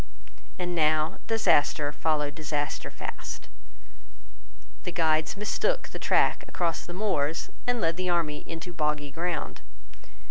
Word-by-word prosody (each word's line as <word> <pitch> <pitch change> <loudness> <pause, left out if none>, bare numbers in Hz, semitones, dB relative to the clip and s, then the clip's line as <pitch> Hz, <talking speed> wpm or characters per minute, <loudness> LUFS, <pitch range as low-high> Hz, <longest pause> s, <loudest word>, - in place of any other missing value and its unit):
And 180 -1 -2
now 155 -1 +2
disaster 150 -9 +3
followed 150 -1 +1
disaster 150 -1 -2
fast. - - -6 1.3
The 180 - -4
guides 160 0 +2
mistook - - 0
the - - -7
track - - +3
across 170 -2 -1
the 175 - -6
moors, 170 -6 0 0.2
and 245 -1 +2
led 165 -3 +1
the 185 0 0
army 160 -4 +1
into 165 +2 -6
boggy 150 -2 0
ground. 165 +1 -2
160 Hz, 120 wpm, -28 LUFS, 150-180 Hz, 1.3 s, disaster